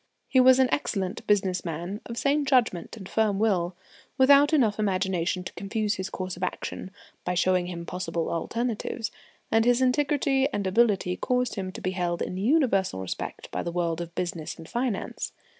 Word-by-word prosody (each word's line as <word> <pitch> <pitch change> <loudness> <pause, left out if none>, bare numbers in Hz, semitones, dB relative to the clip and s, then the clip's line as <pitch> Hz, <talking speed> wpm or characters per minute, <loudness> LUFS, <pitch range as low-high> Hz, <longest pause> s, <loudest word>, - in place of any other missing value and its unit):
He 260 - +3
was 255 0 +7
an 260 -1 +5
excellent 195 -9 -2
business 190 -3 +2
man, 175 +5 -4
of 235 - -6
sane 285 +3 +2
judgment 240 - +1
and 190 -3 -9
firm 215 -2 +1
will, 185 -5 +1 0.4
without 280 +2 +6
enough 230 -9 +3
imagination 185 -3 0
to - - -7
confuse 210 +1 -1
his 190 -2 -4
course 185 -1 -4
of 180 - -12
action 185 - -4 0.3
by 180 - -1
showing 185 0 +2
him 170 -1 -6
possible 175 -2 -3
alternatives; 230 +5 -2 0.4
and 225 0 +4
his 245 +1 +4
integrity 270 +1 +2
and 200 - -2
ability 190 -3 +2
caused 250 -2 0
him 190 -3 -4
to - - -8
be 185 - -1
held 175 -2 -1
in - - -4
universal 205 - +2
respect 95 - -5
by - - -2
the 170 - -3
world 170 -1 -1
of 170 0 -7
business 170 -3 -3
and 165 - -11
finance. 240 -2 -3
195 Hz, 175 wpm, -27 LUFS, 180-245 Hz, 0.4 s, was